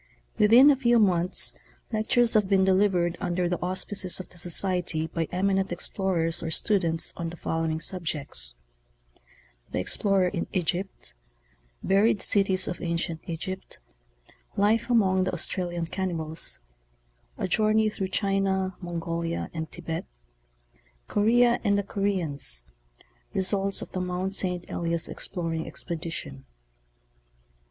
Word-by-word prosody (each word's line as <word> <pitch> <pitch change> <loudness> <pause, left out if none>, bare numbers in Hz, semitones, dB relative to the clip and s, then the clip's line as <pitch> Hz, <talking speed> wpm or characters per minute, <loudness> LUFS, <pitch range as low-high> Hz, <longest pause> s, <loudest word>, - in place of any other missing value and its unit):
Within 240 +7 +7
a - - +3
few 240 -3 +2
months 185 -4 +2 0.4
lectures 225 +2 +2
have 210 -3 +2
been 195 -1 +4
delivered 185 -3 +2
under 180 -1 -1
the 175 0 -3
auspices 185 +1 +1
of 185 - -8
the 180 - -15
Society 175 -2 +2
by 165 0 -3
eminent 195 +1 0
explorers 175 -2 0
or 165 - -4
students 165 -2 0
on 170 -1 -4
the 170 - -9
following 160 -1 -2
subjects: 150 - -3 1.1
The - - -3
Explorer 190 - +2
in 175 -2 -4
Egypt; 185 +1 -3 0.7
Buried 200 +2 +3
Cities 190 -1 +3
of 175 - -5
Ancient 170 -1 -3
Egypt; 185 +3 -6 0.8
Life 215 +4 +2
among 190 -6 +3
the 185 - -2
Australian 175 0 -2
Cannibals; 165 -3 -2 0.8
A - - -2
Journey 215 +3 +2
through 200 -2 -3
China, 190 -1 -1
Mongolia 170 -1 -4
and 160 -1 -5
Thibet; 165 -1 -6 1.0
Korea 235 +3 +3
and 200 -2 +2
the 200 - 0
Koreans; 175 - +3 0.7
Results 195 +1 +1
of - - -12
the 185 - -3
Mt. 180 +1 -3
St. 180 -2 0
Blias 170 -1 -2
Beplonss 165 -4 -3
Expedition. 160 -5 -5
185 Hz, 120 wpm, -26 LUFS, 170-195 Hz, 1.1 s, Within